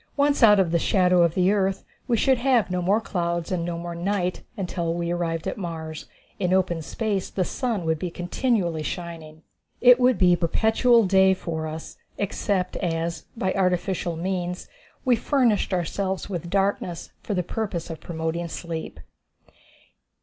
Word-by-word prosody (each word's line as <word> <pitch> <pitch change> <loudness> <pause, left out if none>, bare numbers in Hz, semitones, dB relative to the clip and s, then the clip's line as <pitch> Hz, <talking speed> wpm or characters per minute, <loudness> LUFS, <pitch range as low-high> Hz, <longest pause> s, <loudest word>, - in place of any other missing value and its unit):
Once 285 0 +2
out 210 -3 +7
of 180 -4 +2
the 170 - +2
shadow 180 0 +3
of 170 -1 +3
the 185 +1 +3
earth 195 -2 0 0.2
we 240 -3 +2
should 260 +2 +3
have 240 -7 +2
no 180 0 0
more 195 +5 +3
clouds 170 -5 -2
and 180 -2 0
no 170 0 -3
more 170 0 -5
night 180 +1 -1 0.2
until 175 -3 -2
we 170 0 -2
arrived 165 -2 -2
at - - -4
Mars. 160 -3 -6 0.3
In 180 -2 +1
open 175 -3 +1
space 205 +3 -2
the 185 - -1
sun 230 -7 -2
would 160 -1 0
be 180 - -3
continually 175 -1 -1
shining. 160 -1 -6 0.4
It 250 0 +7
would 250 -3 +4
be 180 -1 +5
perpetual 220 +7 +3
day 190 0 +5
for 160 -3 -4
us, 160 +1 -7 0.2
except 195 -2 -1
as, 165 -2 -2
by 190 -3 0
artificial 180 -2 0
means, 180 +1 -3 0.4
we 250 -2 +5
furnished 235 -5 +1
ourselves 190 +1 -2
with 175 -3 -5
darkness 195 -3 -1
for 205 - -3
the 180 - 0
purpose 180 -4 -4
of 160 - -7
promoting 165 +1 -3
sleep. 165 -1 -6
180 Hz, 165 wpm, -24 LUFS, 170-200 Hz, 0.4 s, out